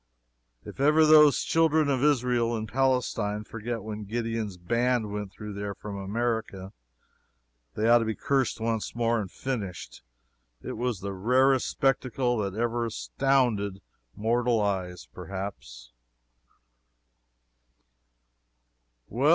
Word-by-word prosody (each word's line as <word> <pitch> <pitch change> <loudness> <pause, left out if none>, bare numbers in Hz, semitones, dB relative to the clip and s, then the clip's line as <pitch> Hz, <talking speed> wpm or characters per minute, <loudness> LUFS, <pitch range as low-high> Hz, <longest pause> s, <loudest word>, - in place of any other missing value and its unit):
If - - -10
ever 150 +3 +5
those 150 -2 +6
children 160 -2 +3
of 135 -2 0
Israel 125 -5 +2
in 110 - -4
Palestine 115 -4 0
forget 115 0 -5
when 105 -1 -6
Gideon's 115 -2 -3
Band 115 +4 0
went 105 -2 -5
through 105 +1 -8
there 100 0 -5
from 105 -1 -7
America, 100 -1 -3 1.0
they 110 - 0
ought 120 +1 +7
to 115 - -1
be 110 -1 -2
cursed 135 -4 0
once 115 -1 -2
more 115 -1 +1
and 100 - -6
finished. 105 -10 -5 0.6
It - - -5
was 120 -4 -2
the 100 0 -4
rarest 130 +7 +3
spectacle 130 -2 0
that 100 -2 -2
ever 120 0 0
astounded 115 -5 0 0.4
mortal 115 +2 +1
eyes, 95 -4 -2
perhaps. 90 -11 -7
115 Hz, 115 wpm, -27 LUFS, 100-125 Hz, 1.0 s, ought